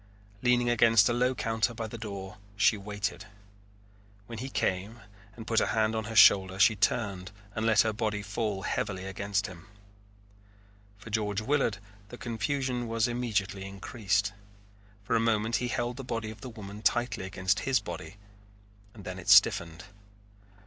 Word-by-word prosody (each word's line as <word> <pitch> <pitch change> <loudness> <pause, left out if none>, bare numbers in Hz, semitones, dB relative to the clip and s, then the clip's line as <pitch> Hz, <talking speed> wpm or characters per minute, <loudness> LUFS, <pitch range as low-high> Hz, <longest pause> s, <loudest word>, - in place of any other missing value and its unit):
Leaning 125 -1 +3
against 115 -3 +5
a - - +1
low 125 +2 +1
counter 115 +1 -1
by 115 - -4
the 110 - -7
door 100 -2 -7 0.2
she 105 +2 +4
waited. 100 0 -4 1.0
When 115 +1 -8
he 130 +3 -5
came 100 0 -2 0.4
and 115 - -9
put 115 0 +2
a - - +1
hand 110 +1 +1
on 110 -1 -2
her 115 +1 -6
shoulder 95 -2 +6
she 105 +3 +5
turned 100 -2 -1 0.2
and 110 +1 -1
let 110 -3 +5
her 110 -1 0
body 105 -1 -2
fall 100 -1 -3
heavily 95 -2 -2
against 100 +1 -2
him. 95 +2 -10 1.3
For 105 +2 -12
George 105 -2 -1
Willard 125 -3 0 0.3
the 120 - -9
confusion 120 +2 -2
was 115 +1 +1
immediately 105 -5 -2
increased. 100 0 -1 0.7
For 115 +3 0
a - - +4
moment 110 0 +1
he 125 - -2
held 120 0 -2
the 135 - -6
body 115 -3 -4
of 110 -1 -13
the 130 - -7
woman 105 -2 -9
tightly 120 -1 0
against 95 +1 0
his 135 -2 +1
body 80 +6 -8 0.8
and 105 - -11
then 95 0 -6
it 90 - -6
stiffened. 85 +1 +5
110 Hz, 165 wpm, -29 LUFS, 100-115 Hz, 1.3 s, shoulder